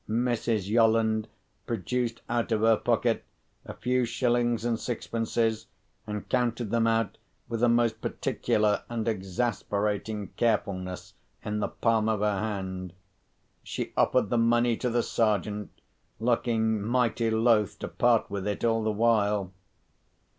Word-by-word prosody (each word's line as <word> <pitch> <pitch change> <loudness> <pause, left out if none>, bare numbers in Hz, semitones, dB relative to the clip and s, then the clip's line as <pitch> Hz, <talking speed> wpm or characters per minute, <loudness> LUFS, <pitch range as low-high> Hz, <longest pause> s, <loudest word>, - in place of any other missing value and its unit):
Mrs. 115 -3 0
Yolland 110 0 +3 0.4
produced 115 +2 -2
out 120 0 -1
of 110 -1 +1
her 115 0 +5
pocket, - - +1 0.4
a - - -8
few 125 +1 +1
shillings 120 -1 +1
and 115 -2 0
sixpences, 115 -1 -1 0.4
and 105 -1 -5
counted 120 -3 0
them 115 -1 +2
out 115 -2 0 0.3
with 115 -1 -3
a 120 - +5
most 115 -1 +2
particular 105 -1 0
and 115 -2 -3
exasperating 105 0 -2
carefulness 100 -5 -1 0.3
in 105 0 -2
the - - 0
palm 110 -2 +1
of 110 -2 0
her 105 -2 +1
hand. 95 -4 -4 0.7
She - - -5
offered 125 -6 +2
the 120 - +3
money 120 +1 +3
to 125 - -1
the 120 0 +1
Sergeant, 105 -1 0 0.5
looking 110 -2 +1
mighty 115 +1 +1
loth 110 -2 +2
to - - -5
part 120 -2 +2
with 100 0 -4
it 105 - -3
all 115 -1 +2
the 110 - 0
while. 105 -3 +1
115 Hz, 135 wpm, -28 LUFS, 105-120 Hz, 0.7 s, her